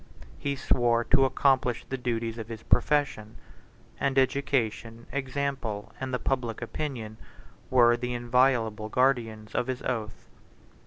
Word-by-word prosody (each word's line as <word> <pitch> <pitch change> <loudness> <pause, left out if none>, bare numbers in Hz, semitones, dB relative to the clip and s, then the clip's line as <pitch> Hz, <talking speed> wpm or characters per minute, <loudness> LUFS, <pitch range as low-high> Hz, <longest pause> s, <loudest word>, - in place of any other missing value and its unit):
He 140 -1 -1
swore 120 -3 +2
to 135 +2 +4
accomplish 130 -3 +2
the 135 - -4
duties 115 -2 -2
of 110 - -6
his 115 -1 -8
profession; 130 -7 +1 0.6
and 135 -1 0
education, 125 -4 0
example, 135 -6 -3
and 130 0 -4
the 125 - +1
public 125 -4 -2
opinion, 115 -3 -5 0.5
were 120 -2 +5
the 125 0 -3
inviolable 120 -3 +1
guardians 115 -4 0
of 125 - 0
his 130 -1 -3
oath. 110 -4 -4
125 Hz, 125 wpm, -28 LUFS, 115-135 Hz, 0.6 s, were